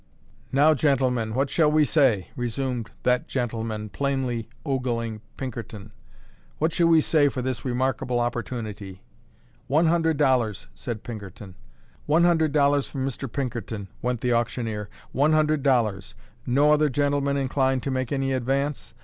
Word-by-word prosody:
"Now, 145 +4 +5
gentlemen, 125 -6 +1
what 135 +1 0
shall 150 0 +3
we 155 0 +4
say?" 130 - +2
resumed 120 -1 -3
that 125 0 +2
gentleman, 110 -4 -3
plainly 130 -1 -2 0.2
ogling 120 -5 -2 0.2
Pinkerton, 110 -5 -7 0.7
"what 160 +1 0
shall 170 - +3
we 165 -1 +6
say 145 -2 +3
for 130 -2 -4
this 130 -2 -3
remarkable 130 0 -1
opportunity?" 110 -5 -4 0.6
"One 155 +5 +3
hundred 160 -1 +2
dollars," 125 - +1
said 115 -3 -6
Pinkerton. 100 -4 -8 0.5
"One 160 +3 +4
hundred 160 -3 +3
dollars 145 -1 +3
from 135 -1 -3
Mr. 135 -1 -5
Pinkerton," 115 -7 -4
went 125 -1 -1
the 125 -1 +1
auctioneer, 115 -3 -2 0.2
"one 145 +4 +3
hundred 155 -1 +2
dollars. 115 - +1 0.3
No 140 +4 +4
other 150 0 +3
gentleman 140 +1 +1
inclined 130 -1 +1
to 135 - -2
make 130 -2 -2
any 135 -1 0
advance? 135 +3 -2
130 Hz, 140 wpm, -25 LUFS, 115-145 Hz, 0.7 s, we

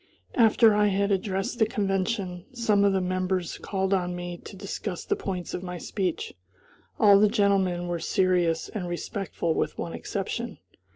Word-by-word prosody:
After 225 -1 +5
I 210 0 +4
had 200 +1 +1
addressed 195 +3 -1
the 220 - +4
convention, 195 -3 -1
some 215 -4 +2
of 200 - +5
the 190 -1 +1
members 185 -1 -1
called 190 -1 -1
on 180 -2 0
me 175 0 -5
to - - -9
discuss 195 -1 -5
the - - +1
points 180 -3 -4
of - - -3
my 180 -1 -5
speech. 185 -1 -3 0.7
All 200 -2 +7
the 210 0 +5
gentlemen 190 -4 +2
were 175 -1 -2
serious 175 -2 +1
and 190 -5 -5
respectful 175 -2 -2
with - - -1
one - - -4
exception. - - -4
190 Hz, 165 wpm, -27 LUFS, 180-205 Hz, 0.7 s, All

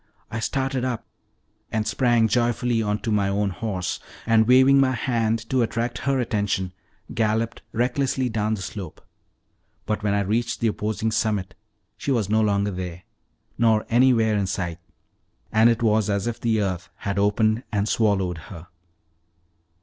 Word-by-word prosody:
I 110 - -3
started 135 +2 -1
up, 125 -3 -2 0.7
and 110 -1 0
sprang 120 -3 +3
joyfully 120 0 +1
onto 105 +1 -1
my 100 -2 +2
own 100 0 0
horse, 95 -3 -3 0.3
and 110 -1 +4
waving 130 +2 +6
my 130 -1 +3
hand 115 -2 -1
to 130 -1 +3
attract 120 +1 -1
her 135 -1 +2
attention, 100 -5 -1 0.4
galloped 115 +1 0
recklessly 130 +2 0
down 110 -1 0
the 95 - -6
slope; 95 -1 -8 0.8
but 110 0 -2
when 105 -1 +1
I 100 - +2
reached 115 +4 -1
the 115 - -1
opposing 110 +1 -2
summit 105 -4 -1 0.4
she 115 - -5
was 110 -6 +1
no 110 0 +4
longer 100 -1 +1
there, 90 -1 -6 0.6
nor 110 -2 +3
anywhere 115 -3 +4
in 100 -2 0
sight, 90 -2 -3 0.7
and 110 +2 +5
it 115 0 0
was 110 -2 +2
as 100 -1 0
if 120 -1 -3
the 110 -2 +1
earth 90 -3 -3
had 100 0 -3
opened 110 +2 +2
and 105 -1 0
swallowed 95 -6 +1
her. 85 -3 -10
110 Hz, 155 wpm, -24 LUFS, 100-120 Hz, 0.8 s, waving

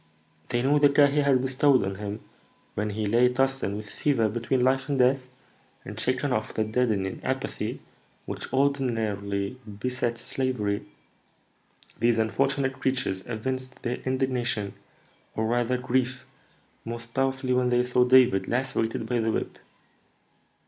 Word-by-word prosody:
They 120 -1 0
knew 145 +2 +4
the 145 0 +6
care 140 0 +5
he 145 +2 +1
had 135 -3 +3
bestowed 135 -1 +3
on 95 - -2
him 105 +2 -5 0.5
when 105 +1 -2
he 105 +1 -2
lay 120 +4 +4
tossing 135 -5 0
with 105 0 -7
fever 115 -1 +1
between 120 +3 0
life 130 +2 +2
and 140 - +1
death, 130 +1 +3 0.6
and, 105 +2 -7
shaking 130 +3 0
off 110 -1 -2
the 110 - +2
deadening 110 -4 -1
apathy - - -3 0.4
which - - -6
ordinarily 115 -6 0 0.2
besets 120 0 -2
slavery, 110 -6 -2 1.1
these 120 0 +3
unfortunate 135 +4 0
creatures 125 -8 -1
evinced 130 +3 -4
their 125 0 -1
indignation, 125 -6 -1 0.6
or 110 - 0
rather 120 +2 +1
grief, 130 +1 -1 0.6
most 115 0 -7
powerfully 135 -1 0
when 125 0 +2
they 125 0 +3
saw 125 0 +3
David 125 -5 +5
lacerated 115 -3 -1
by 120 +1 0
the 110 0 +1
whip. - - -3
125 Hz, 140 wpm, -26 LUFS, 110-130 Hz, 1.1 s, the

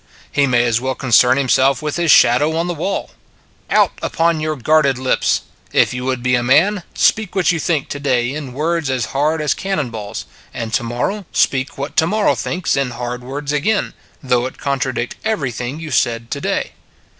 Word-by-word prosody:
He 140 0 +2
may 120 -2 +3
as 115 0 +1
well 130 0 -2
concern 125 0 +4
himself 135 -1 +3
with 150 -1 -2
his 170 -1 0
shadow 145 +4 +5
on 165 - 0
the 175 - -2
wall. 175 +5 -3 0.6
Out - - +4
upon 165 -1 +1
your 155 0 -2
guarded 140 0 +2
lips!... 130 0 +1 0.3
If - - +3
you 125 0 -4
would 130 -2 -2
be 125 0 +1
a 120 - +3
man, 175 +11 +3
speak 215 -3 +2
what 185 -2 +3
you 165 - -1
think 160 -4 0
to 145 - -5
day 130 -2 0
in 145 -4 -6
words 160 +1 -1
as 130 -3 0
hard 155 +3 +1
as 150 - +2
cannon 190 -11 -2
balls, 105 -2 -6 0.3
and 115 -1 -4
to 115 - +2
morrow 145 - -3
speak 135 0 0
what 140 +2 -5
to 160 - +4
morrow 215 +3 +2
thinks 180 -5 -2
in 140 -2 0
hard 125 0 -5
words 140 +3 -4
again, 200 +9 0 0.3
though 125 -1 +1
it - - -11
contradict 130 -3 -2
everything 135 - -2
you 160 -2 -7
said 115 -1 0
to 140 - -3
day. - - -1
140 Hz, 195 wpm, -18 LUFS, 125-160 Hz, 0.6 s, shadow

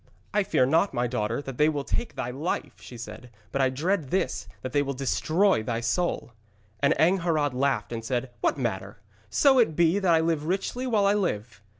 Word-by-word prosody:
'I 210 0 +3
fear 130 - +3
not, 160 +4 +2
my 120 0 +1
daughter, 120 +1 -2
that 135 -3 -8
they 150 +1 +5
will 145 -2 -2
take 240 - -3
thy 125 -2 -3
life,' 145 0 -4
she 120 - -10
said, 115 +1 -9 0.2
'but 135 - 0
I 130 - +4
dread 155 +3 -1
this 185 - -1 0.2
that 130 - -5
they 145 - +3
will 140 -1 -3
destroy 155 - +2
thy 115 +1 -2
soul!' 125 +4 -1 0.5
And 140 +2 +3
Angharad 160 -4 +2
laughed 125 -4 0
and 115 -1 -4
said: 125 +2 -2
'What - - +1
matter, 105 -6 -3 0.3
so 265 - +4
it 190 -10 +3
be 170 +4 +3
that 190 -3 +2
I - - +4
live 160 -2 0
richly 200 +8 -2
while 215 -5 +2
I 200 - +4
live!' 115 - -2
140 Hz, 205 wpm, -26 LUFS, 125-175 Hz, 0.5 s, they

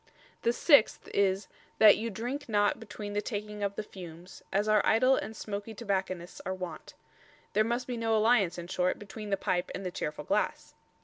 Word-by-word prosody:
The 235 - +3
sixth 280 -1 +4
is 195 0 +2 0.3
"that 215 -2 +8
you 230 +2 -3
drink 245 +7 -4
not 205 -1 +2
between 205 -2 -7
the 205 - 0
taking 210 -1 -5
of 200 0 -1
the 215 - -3
fumes, 180 -3 -11
as 200 +2 +1
our 215 -1 +4
idle 255 +4 +4
and 220 -1 -4
smoakie 205 +1 -6
Tobacconists 190 -5 -3
are 190 +1 -3
wont" 180 -3 -7 0.6
there 215 +2 +4
must 235 +3 -1
be 245 -2 -4
no 225 -1 +1
alliance, 215 -5 +3
in 175 - -5
short, 180 +1 0
between 210 +1 -8
the 195 - +1
pipe 175 -1 -1
and 195 - -6
the 180 - -2
cheerful 150 - -4
glass. - - -1
205 Hz, 190 wpm, -30 LUFS, 190-225 Hz, 0.6 s, that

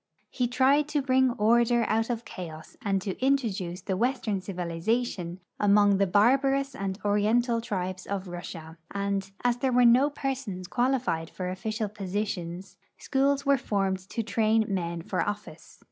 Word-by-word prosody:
He 250 -2 0
tried 270 +4 +3
to 300 -1 0
bring 260 -1 +3
order 235 +2 +3
out 225 +2 +1
of 235 -1 -3
chaos 160 -4 -9
and 195 -2 0
to 190 - -2
inti'oduce 215 -10 -1
Avestern 215 0 -1
civilization 180 +1 -2 0.2
among 205 -1 +4
the 200 - +3
barbarous 270 +7 +3
and 195 -1 -3
oriental 230 +3 +2
tribes 185 -4 -4
of 195 -1 -3
Russia, 170 -2 -8
and, 200 -1 -2
as 245 -1 +2
there 260 +1 0
Avere 245 0 +5
no 255 +5 +5
persons 265 -10 -4
qualified 240 -11 0
for 180 -1 -4
official 215 +3 -3
positions, 195 -3 -4 0.2
schools 275 +1 +1
Avere 280 -1 +3
formed 195 -5 0
to 230 - -2
train 220 +1 +2
men 170 -4 -2
for - - -1
office. 205 0 -6
210 Hz, 145 wpm, -27 LUFS, 190-245 Hz, 0.2 s, Avere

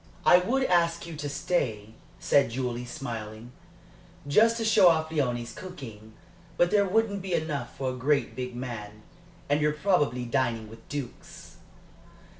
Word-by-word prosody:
"I 180 - +8
would 255 +9 0
ask 170 -5 +2
you 170 -1 -7
to 145 -1 -4
stay," 130 -8 -2 0.3
said 140 - +3
Julie, 125 0 -3
smiling, 115 -4 -7 0.8
"just 225 +10 +4
to 225 - -2
show 210 -4 +6
off 160 -1 +1
Léonie's 125 -6 -1
cooking; 115 - -10 0.4
but 175 - +3
there 205 -1 +4
wouldn't 200 0 +1
be 185 -1 -4
enough 155 -3 -3
for 130 -1 -1
a - - -6
great 140 +3 0
big 125 -1 -5
man. 110 -4 -7 0.4
And 145 +1 +1
you're 150 0 +2
probably 150 -8 +1
dining 120 -3 -1
with 115 0 -15
dukes." 145 -4 -8
140 Hz, 150 wpm, -27 LUFS, 120-175 Hz, 0.8 s, I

